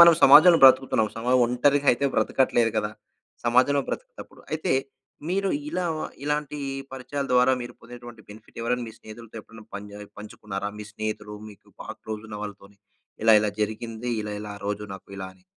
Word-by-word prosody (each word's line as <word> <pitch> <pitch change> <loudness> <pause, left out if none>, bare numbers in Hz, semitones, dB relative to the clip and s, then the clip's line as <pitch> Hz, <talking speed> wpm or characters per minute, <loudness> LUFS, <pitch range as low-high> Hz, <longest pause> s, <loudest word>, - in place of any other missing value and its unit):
మనం 170 0 +10
సమాజంలో 170 +1 +9
బ్రతుకుతున్నాం. 130 -4 +5
సమాజం 125 +2 +2
ఒంటరిగా 140 +4 +2
అయితే 130 +4 -2
బ్రతకట్లేదు 120 -3 +2
కదా. 105 - 0 0.5
సమాజంలో 130 +4 +3
బ్రతకటప్పుడు - - -8
అయితే 155 -3 0 0.6
మీరు 195 +2 0 0.2
ఇలా 180 - -2 0.4
ఇలాంటి 150 0 -2 0.3
పరిచయాల 135 +2 -4
ద్వారా 125 +1 +5
మీరు 120 - -7
పొందినటువంటి 120 -1 -12
బెనిఫిట్ 105 +2 -14
ఎవరైనా 120 +1 -1
మీ - - -10
స్నేహితులతో 110 +1 -12
ఎప్పుడైనా 110 0 -15
పంచ్ 100 0 -7 0.3
పంచుకున్నారా? 105 -1 -6
మీ 105 - -7
స్నేహితులు 105 -1 -5 0.2
మీకు 100 - -18 0.2
బాగా - - -7
క్లోజ్ 110 0 -6
ఉన్న 105 -1 -7
వాళ్ళతోని 100 -1 -10 0.5
ఇలా 110 -1 +7
ఇలా 105 - 0
జరిగింది 115 +2 -4
ఇలా 105 0 -5
ఇలా 105 -1 -7
ఆ - - -24
రోజు 105 0 -2
నాకు 95 - -13
ఇలా 95 -1 -5
అని. 185 - -27
115 Hz, 160 wpm, -25 LUFS, 105-135 Hz, 0.6 s, మనం